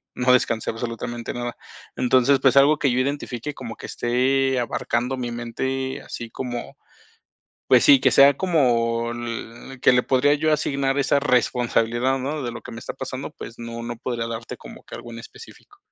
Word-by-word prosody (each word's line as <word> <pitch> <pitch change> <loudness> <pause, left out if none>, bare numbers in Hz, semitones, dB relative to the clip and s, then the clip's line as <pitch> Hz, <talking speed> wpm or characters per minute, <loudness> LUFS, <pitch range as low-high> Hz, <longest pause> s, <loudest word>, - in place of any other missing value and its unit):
no 125 0 +3
descansé 115 -3 +1
absolutamente 115 +1 -5
nada. 120 -1 -4 0.4
Entonces, 130 +2 +3
pues 135 0 +4
algo 145 +2 +5
que 135 - +2
yo 125 - +1
identifique, 140 0 -3
como 120 -4 -8
que - - -10
esté 130 +2 +1
abarcando 120 +1 -1
mi 120 -2 -4
mente, 130 +3 -3
así 115 - -7
como, 120 -2 -5 0.9
pues - - +6
sí, 140 -2 +7
que - - +4
sea 140 0 +7
como, 120 -9 +1
le 120 +2 -7
que - - +5
le 125 0 +3
podría 140 +2 +3
yo 155 +1 +1
asignar 140 -2 0
esa 140 +1 +2
responsabilidad, 125 -1 +1
¿no?, 145 +3 -3
de 120 - -3
lo 120 - -8
que - - -10
me 115 - -8
está - - -6
pasando, - - -6
pues 115 - -10
no 115 0 -6
no 120 0 -5
podría 115 0 -3
darte 115 0 -6
como - - -12
que - - -11
algo 120 - -10
en 115 - -8
específico. 410 - -15
125 Hz, 180 wpm, -23 LUFS, 120-135 Hz, 0.9 s, sí